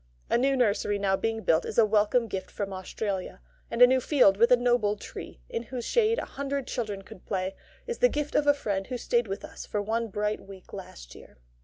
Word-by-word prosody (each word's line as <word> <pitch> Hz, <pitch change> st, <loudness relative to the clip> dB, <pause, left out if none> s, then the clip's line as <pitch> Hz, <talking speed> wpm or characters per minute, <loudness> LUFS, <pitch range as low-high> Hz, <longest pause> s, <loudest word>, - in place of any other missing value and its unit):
A -, -, +5 dB
new 270 Hz, +1 st, +2 dB
nursery 210 Hz, -3 st, +2 dB
now 195 Hz, -1 st, +2 dB
being 225 Hz, +2 st, -2 dB
built 160 Hz, 0 st, +3 dB
is -, -, -6 dB
a 230 Hz, -, +7 dB
welcome 215 Hz, +3 st, +2 dB
gift 190 Hz, -3 st, -5 dB
from 200 Hz, -1 st, -4 dB
Australia; 190 Hz, -, -4 dB, 0.3 s
and 240 Hz, -, +5 dB
a -, -, +13 dB
new 260 Hz, +1 st, +3 dB
field 250 Hz, -9 st, +5 dB
with 230 Hz, +4 st, +4 dB
a 250 Hz, -, +7 dB
noble 240 Hz, -4 st, +2 dB
tree, 65 Hz, -, -9 dB
in -, -, -3 dB
whose 240 Hz, +1 st, -6 dB
shade 460 Hz, -1 st, +2 dB
a -, -, -2 dB
hundred 280 Hz, -1 st, -3 dB
children 210 Hz, -5 st, -4 dB
could 190 Hz, -, -13 dB
play, 190 Hz, -1 st, -2 dB, 0.3 s
is 475 Hz, -1 st, -4 dB
the -, -, +5 dB
gift 295 Hz, -, -3 dB
of 290 Hz, -, +2 dB
a 290 Hz, -, +7 dB
friend 200 Hz, -8 st, -2 dB
who 255 Hz, -, -3 dB
stayed 240 Hz, -1 st, +1 dB
with 195 Hz, 0 st, -5 dB
us -, -, -9 dB
for 210 Hz, -, -2 dB
one 225 Hz, +3 st, -1 dB
bright 210 Hz, +1 st, -2 dB
week 195 Hz, -1 st, -13 dB
last 60 Hz, -, -9 dB
year. -, -, -15 dB
220 Hz, 225 wpm, -28 LUFS, 195-250 Hz, 0.3 s, a